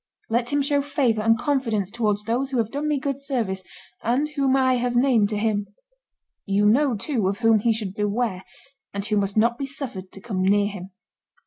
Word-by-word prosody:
Let 240 +1 +1
him 285 0 +2
show 285 0 +1
favor 260 -6 0
and 225 +1 +3
confidence 230 -7 -1
towards 210 -3 0
those 240 +5 -1
who 265 - -2
have 225 -1 0
done 290 +2 -2
me 295 -2 +1
good 275 0 -3
service 225 -9 -2 0.4
and 260 +6 0
whom 275 -3 +1
I 260 -1 +3
have 245 0 -1
named 240 -5 +3
to 210 - -2
him. 205 -1 0 0.8
You 200 +1 +2
know, 250 +4 +4
too, 215 -1 -1
of 195 +1 -1
whom 225 -1 +5
he 230 +3 +2
should 215 -4 -3
beware, 205 -1 -1 0.5
and 200 0 -3
who 210 - 0
must 200 +1 -1
not 235 +2 +3
be 275 - -3
suffered 250 -10 -5
to - - -11
come 195 -3 -3
near 200 +2 +3
him." 195 -2 -7
225 Hz, 205 wpm, -24 LUFS, 205-265 Hz, 0.8 s, whom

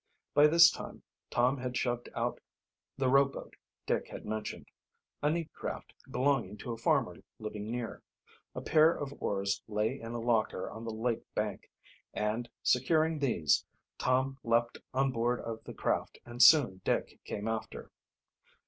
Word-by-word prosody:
By 145 +1 +7
this 165 +1 +8
time - - -8 0.3
Tom 125 +3 +2
had 125 -1 -3
shoved 120 -1 -1
out - - -1 0.6
the 135 -1 +1
rowboat 135 +1 +2 0.3
Dick - - 0
had - - -9
mentioned 110 0 -4 0.6
a 150 - +2
neat 165 0 -2
craft - - -6 0.2
belonging 125 -7 +1
to 120 - -6
a 115 - -4
farmer 125 - +1 0.2
living 105 -1 -6
near. 120 -1 -4 0.5
A - - -4
pair 155 +1 +5
of 140 -1 -5
oars 100 0 -1
lay 110 +5 -1
in 115 +1 -7
a 120 - -3
locker 115 -5 0
on 110 +1 -8
the 115 - -3
lake 115 +1 -1
bank; - - -3 0.5
and, 110 +3 -1
securing 155 +5 +2
these, 115 - +2 0.4
Tom 130 +1 +1
leaped 115 0 +1
on 135 +1 +1
board 120 0 0
of 115 -1 -6
the - - -7
craft, - - -1
and 120 +1 -4
soon 120 -12 +7
Dick - - -1
came 105 +2 -4
after. 110 -1 -4
120 Hz, 155 wpm, -31 LUFS, 110-135 Hz, 0.6 s, this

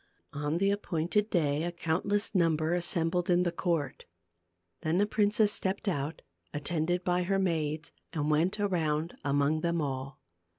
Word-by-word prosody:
On 150 +2 -1
the 195 +2 +2
appointed 200 +1 0
day 150 -6 +1
a 175 +1 -1
countless 180 +6 -1
number 165 -3 +2
as 175 -1 +1
sembled 170 +1 0
in 180 0 +4
the 175 - 0
court. 165 -6 -2 0.8
Then 160 +2 +1
the 205 - +4
princess 210 0 +3
stepped 195 +1 -2
out, 150 -4 -2 0.3
attended 165 +4 -1
by 180 0 +1
her 195 +2 +1
maids, 160 -5 -1 0.2
and 150 -2 -1
went 170 +7 +2
around 165 -5 0
among 145 +2 +1
them 170 0 0
all. 135 -1 -3
170 Hz, 155 wpm, -30 LUFS, 150-185 Hz, 0.8 s, in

